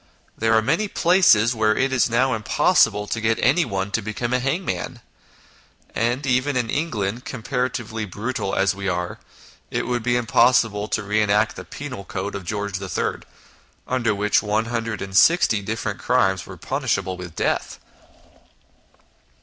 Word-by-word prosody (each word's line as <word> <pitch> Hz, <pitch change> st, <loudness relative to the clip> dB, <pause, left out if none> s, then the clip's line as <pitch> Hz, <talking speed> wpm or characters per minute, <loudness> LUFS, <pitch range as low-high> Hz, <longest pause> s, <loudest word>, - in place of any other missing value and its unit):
There 115 Hz, 0 st, +2 dB
are 135 Hz, -, +2 dB
places 170 Hz, -, +4 dB
where 110 Hz, -1 st, +1 dB
it 135 Hz, 0 st, +1 dB
is 125 Hz, -1 st, +2 dB
now 125 Hz, +3 st, +2 dB
impossible 105 Hz, -1 st, +2 dB
to 115 Hz, +2 st, -3 dB
get 110 Hz, +1 st, +1 dB
anyone 100 Hz, -, +1 dB
to 110 Hz, -, 0 dB
become 110 Hz, +4 st, -3 dB
a 125 Hz, -, +2 dB
hangman, 135 Hz, -, -2 dB, 0.9 s
and 120 Hz, +4 st, 0 dB
even 130 Hz, +1 st, +1 dB
in 120 Hz, -3 st, -1 dB
England, 120 Hz, -7 st, -2 dB
comparatively 115 Hz, -3 st, -3 dB
brutal 105 Hz, +1 st, -3 dB
as 95 Hz, -1 st, +2 dB
we 100 Hz, 0 st, -5 dB
are, 90 Hz, 0 st, -3 dB, 0.5 s
it -, -, -2 dB
would 120 Hz, -1 st, -1 dB
be 120 Hz, +1 st, +1 dB
impossible 115 Hz, -3 st, +3 dB
to 110 Hz, -, -2 dB
re 105 Hz, +1 st, +1 dB
enact 105 Hz, +1 st, +2 dB
the -, -, -8 dB
penal 130 Hz, -8 st, -7 dB
code 95 Hz, +1 st, -5 dB
of 100 Hz, -2 st, -6 dB
George 100 Hz, -1 st, -3 dB
m., 95 Hz, -, -2 dB, 0.7 s
under 120 Hz, -4 st, 0 dB
which 105 Hz, +1 st, +2 dB
160 110 Hz, -, +2 dB
different 105 Hz, -1 st, -4 dB
crimes 95 Hz, -7 st, +1 dB
were -, -, -9 dB
punishable 95 Hz, -, -2 dB
with 90 Hz, -2 st, -9 dB
death. -, -, -1 dB
110 Hz, 140 wpm, -22 LUFS, 100-125 Hz, 0.9 s, places